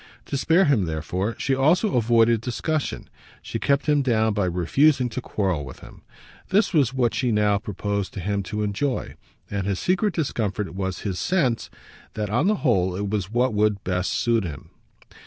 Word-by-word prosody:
To -, -, -4 dB
spare 165 Hz, +7 st, +3 dB
him 130 Hz, -, +2 dB
therefore 85 Hz, +7 st, -3 dB
she 135 Hz, -, 0 dB
also 160 Hz, +10 st, +2 dB
avoided 115 Hz, -1 st, +3 dB
discussion; 140 Hz, +6 st, -3 dB, 0.4 s
she -, -, -4 dB
kept 140 Hz, 0 st, +1 dB
him 150 Hz, -2 st, +3 dB
down 110 Hz, -4 st, +2 dB
by 100 Hz, -2 st, 0 dB
refusing 125 Hz, -, +2 dB
to 125 Hz, -, -5 dB
quarrel 95 Hz, -10 st, -1 dB
with 65 Hz, -3 st, -10 dB
him. -, -, -13 dB, 0.5 s
This 205 Hz, +2 st, +2 dB
was 140 Hz, -7 st, +3 dB
what 125 Hz, -3 st, +1 dB
she 125 Hz, -3 st, 0 dB
now 105 Hz, -1 st, +2 dB
proposed 100 Hz, -2 st, -3 dB
to -, -, -4 dB
him 100 Hz, +2 st, -1 dB
to 105 Hz, -1 st, -2 dB
enjoy, 105 Hz, +6 st, -2 dB, 0.4 s
and 100 Hz, -1 st, -2 dB
his 100 Hz, -2 st, 0 dB
secret 190 Hz, -, 0 dB
discomfort 105 Hz, -, -2 dB
was 95 Hz, -1 st, -3 dB
his 95 Hz, -3 st, -3 dB
sense 145 Hz, -11 st, 0 dB, 0.5 s
that 105 Hz, -1 st, -3 dB
on 125 Hz, -, +2 dB
the 215 Hz, -, +3 dB
whole 95 Hz, -7 st, +2 dB
it 100 Hz, +1 st, -3 dB
was 100 Hz, -3 st, -2 dB
what 120 Hz, +2 st, +1 dB
would 105 Hz, -1 st, +1 dB
best 90 Hz, 0 st, -1 dB
suit 115 Hz, -2 st, +1 dB
him. 75 Hz, -6 st, -8 dB
110 Hz, 180 wpm, -24 LUFS, 100-135 Hz, 0.5 s, spare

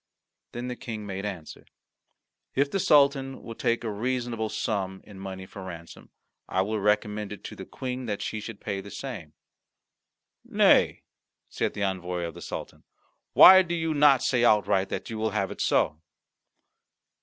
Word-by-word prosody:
Then 120 Hz, +1 st, -5 dB
the 125 Hz, -, -4 dB
King 110 Hz, -3 st, -7 dB
made 100 Hz, 0 st, -4 dB
answer: 90 Hz, -6 st, -8 dB, 0.9 s
"If 140 Hz, +1 st, +1 dB
the 195 Hz, -, 0 dB
Sultan 140 Hz, -4 st, +3 dB
will 115 Hz, -, -7 dB
take 115 Hz, +1 st, -1 dB
a 110 Hz, -, -2 dB
reasonable 120 Hz, 0 st, -2 dB
sum 100 Hz, -4 st, -3 dB
in 100 Hz, -3 st, -13 dB
money 95 Hz, -1 st, -7 dB
for 95 Hz, 0 st, -10 dB
ransom, 85 Hz, -3 st, -10 dB, 0.4 s
I 95 Hz, -, +1 dB
will 110 Hz, +2 st, -2 dB
recommend 105 Hz, 0 st, 0 dB
it 105 Hz, -, -8 dB
to -, -, -8 dB
the -, -, -9 dB
Queen 130 Hz, -1 st, -5 dB
that 105 Hz, -2 st, -3 dB
she 110 Hz, -, -3 dB
should 105 Hz, -1 st, -8 dB
pay 100 Hz, -2 st, -4 dB
the 100 Hz, -, -11 dB
same." 100 Hz, -, -7 dB, 1.1 s
"Nay," -, -, +3 dB, 0.5 s
said -, -, -2 dB
the 100 Hz, -, -2 dB
envoy 90 Hz, -2 st, -2 dB
of 85 Hz, -1 st, -4 dB
the -, -, -11 dB
Sultan, -, -, -7 dB, 0.5 s
"why 190 Hz, 0 st, +10 dB
do 175 Hz, -2 st, -3 dB
you 165 Hz, -1 st, -1 dB
not 145 Hz, -3 st, +5 dB
say 125 Hz, -2 st, +2 dB
outright 105 Hz, -4 st, +3 dB
that -, -, -5 dB
you 110 Hz, -, -4 dB
will 110 Hz, 0 st, 0 dB
have 95 Hz, -2 st, -1 dB
it -, -, -6 dB
so?" 75 Hz, -, +1 dB
105 Hz, 170 wpm, -27 LUFS, 95-125 Hz, 1.1 s, why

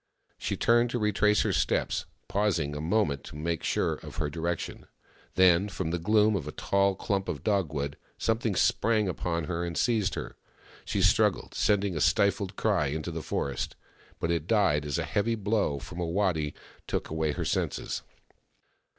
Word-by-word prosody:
She -, -, -2 dB
turned 120 Hz, +1 st, +4 dB
to 120 Hz, -, -1 dB
retrace 105 Hz, -1 st, +3 dB
her 105 Hz, -, 0 dB
steps, 70 Hz, -4 st, 0 dB, 0.2 s
pausing 95 Hz, -7 st, 0 dB
a 75 Hz, -, -4 dB
moment 80 Hz, -, +1 dB
to -, -, -10 dB
make 80 Hz, +2 st, -2 dB
sure -, -, +1 dB
of -, -, -9 dB
her 75 Hz, -, -2 dB
direction. 85 Hz, +1 st, -3 dB, 0.5 s
Then, 95 Hz, +2 st, +5 dB
from 80 Hz, -4 st, -3 dB
the 85 Hz, -, -1 dB
gloom 105 Hz, +4 st, +3 dB
of 80 Hz, -7 st, -3 dB
a -, -, -4 dB
tall 100 Hz, +3 st, +1 dB
clump 95 Hz, 0 st, -2 dB
of 70 Hz, -5 st, -4 dB
dogwood, 75 Hz, -9 st, 0 dB, 0.2 s
something 115 Hz, -2 st, 0 dB
sprang 110 Hz, 0 st, +2 dB
upon 85 Hz, -2 st, -2 dB
her 85 Hz, +3 st, -2 dB
and 85 Hz, -1 st, -3 dB
seized 110 Hz, -5 st, +1 dB
her. -, -, -6 dB, 0.5 s
She -, -, 0 dB
struggled, -, -, +3 dB
sending 100 Hz, -3 st, +1 dB
a 75 Hz, -, -1 dB
stifled 100 Hz, -1 st, +2 dB
cry 100 Hz, -10 st, +1 dB
into 80 Hz, +4 st, -3 dB
the 80 Hz, 0 st, -4 dB
forest— 70 Hz, -1 st, -3 dB, 0.4 s
but 85 Hz, -, 0 dB
it 85 Hz, -1 st, -1 dB
died 95 Hz, -10 st, +3 dB
as 70 Hz, -, -1 dB
a -, -, 0 dB
heavy 115 Hz, +3 st, 0 dB
blow 105 Hz, -8 st, 0 dB
from 85 Hz, +5 st, -8 dB
a 85 Hz, -, -1 dB
waddy 85 Hz, -5 st, 0 dB, 0.3 s
took -, -, -2 dB
away 80 Hz, -1 st, 0 dB
her -, -, -3 dB
senses. -, -, -1 dB
90 Hz, 175 wpm, -28 LUFS, 80-105 Hz, 0.5 s, Then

